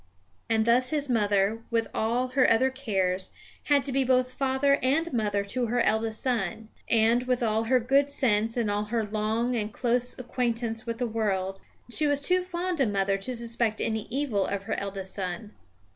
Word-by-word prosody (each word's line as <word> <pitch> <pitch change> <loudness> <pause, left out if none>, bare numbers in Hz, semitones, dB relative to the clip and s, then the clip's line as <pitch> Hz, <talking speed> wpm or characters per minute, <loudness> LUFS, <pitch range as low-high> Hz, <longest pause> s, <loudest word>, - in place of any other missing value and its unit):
And 220 -1 +2
thus 250 +2 +3
his 290 -2 -1
mother, 205 -1 +2
with 230 -1 0
all 240 +3 0
her 255 0 +3
other 260 +4 +3
cares, 190 -8 -1 0.4
had 285 -2 +3
to 280 - -3
be 270 +1 +2
both 255 0 +2
father 270 +1 +2
and 290 +5 +1
mother 205 -3 0
to 240 +4 -2
her 245 +2 0
eldest 220 0 +1
son; 225 -3 -2 0.2
and, 230 +2 +3
with 250 -1 +1
all 220 0 +1
her 255 +2 +3
good 275 +4 +2
sense 230 -4 +1
and 225 -4 +1
all 205 +1 -1
her 225 0 -1
long 220 +4 -1
and 215 -2 -2
close 245 +1 0
acquaintance 235 -2 -2
with 230 0 -3
the 245 - -1
world, 195 -4 -1 0.3
she 300 +5 +2
was 285 -1 +2
too 365 +6 +2
fond 360 -1 -3
a 270 - +3
mother 195 -1 0
to 250 +6 -4
suspect 230 -1 -1
any 220 -1 -2
evil 245 -6 0
of 200 -1 -3
her - - -3
eldest 195 -1 -5
son. 195 +2 -4
230 Hz, 190 wpm, -27 LUFS, 210-255 Hz, 0.4 s, thus